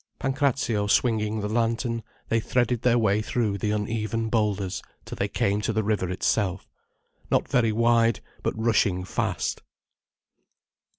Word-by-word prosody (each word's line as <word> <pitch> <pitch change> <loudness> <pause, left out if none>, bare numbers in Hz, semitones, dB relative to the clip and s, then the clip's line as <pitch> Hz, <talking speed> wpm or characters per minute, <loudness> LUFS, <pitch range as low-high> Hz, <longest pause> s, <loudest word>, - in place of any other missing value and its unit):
Pancrazio 135 -6 0
swinging 110 -1 +1
the 105 - -2
lantern, 115 +1 0 0.3
they 115 - +2
threaded 120 0 0
their 120 -1 +3
way 105 -2 +2
through 110 -2 -1
the 105 - -1
uneven 110 +1 -1
boulders 105 -4 0 0.2
till - - -7
they - - -1
came 100 +1 0
to 110 - -1
the 110 0 0
river 100 -3 0
itself—not 95 +1 -2
very 115 -3 +2
wide, 115 0 +3 0.2
but - - -2
rushing 105 -5 +2
fast. 95 - -2
110 Hz, 130 wpm, -26 LUFS, 105-115 Hz, 0.3 s, their